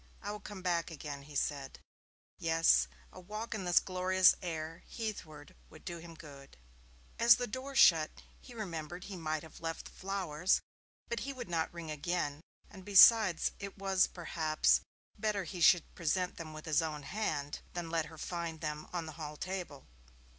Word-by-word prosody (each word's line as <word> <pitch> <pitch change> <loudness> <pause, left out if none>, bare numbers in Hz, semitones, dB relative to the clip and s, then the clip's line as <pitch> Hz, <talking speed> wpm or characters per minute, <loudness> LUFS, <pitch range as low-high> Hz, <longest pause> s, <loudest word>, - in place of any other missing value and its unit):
'I 205 - -3
will 210 - -6
come 205 -3 -9
back 175 -2 0
again,' 145 -3 -7
he 145 +1 -13
said. 140 -1 -2 0.6
Yes, 165 0 +4 0.3
a - - -10
walk 215 +6 -5
in 205 -4 -4
this 175 -1 +5
glorious 185 0 +4
air 165 -1 -5
heathward 165 -10 -6 0.2
would 155 - -15
do 170 -1 -5
him 165 0 -11
good. 140 - -13 0.6
As 235 0 +8
the 245 - -2
door 260 +4 -6
shut 165 -12 +6 0.3
he 245 - -13
remembered 175 -4 -5
he 200 - -7
might 155 -3 -2
have 160 - -13
left 165 -1 -4
the - - -10
flowers, 185 -3 0 0.5
but 235 - -2
he 275 - -4
would 255 -8 -7
not 165 -2 0
ring 170 -2 -7
again, 155 -1 -2 0.3
and 190 -2 -12
besides, 205 -2 +7
it 200 0 -7
was, 195 -1 +3
perhaps, 160 -3 +1 0.4
better 210 -3 0
he 175 +1 -6
should 170 0 +5
present 180 +2 -1
them 160 -2 -7
with 155 +1 -9
his 155 -2 +2
own 155 -2 -4
hand, 145 -6 -3 0.2
than 170 -2 -4
let 165 -2 +1
her 160 0 -12
find 170 -1 -4
them 150 -1 -4
on 175 -2 -3
the 160 - -7
hall 150 0 -6
table. 180 -6 -5
170 Hz, 175 wpm, -33 LUFS, 155-190 Hz, 0.6 s, As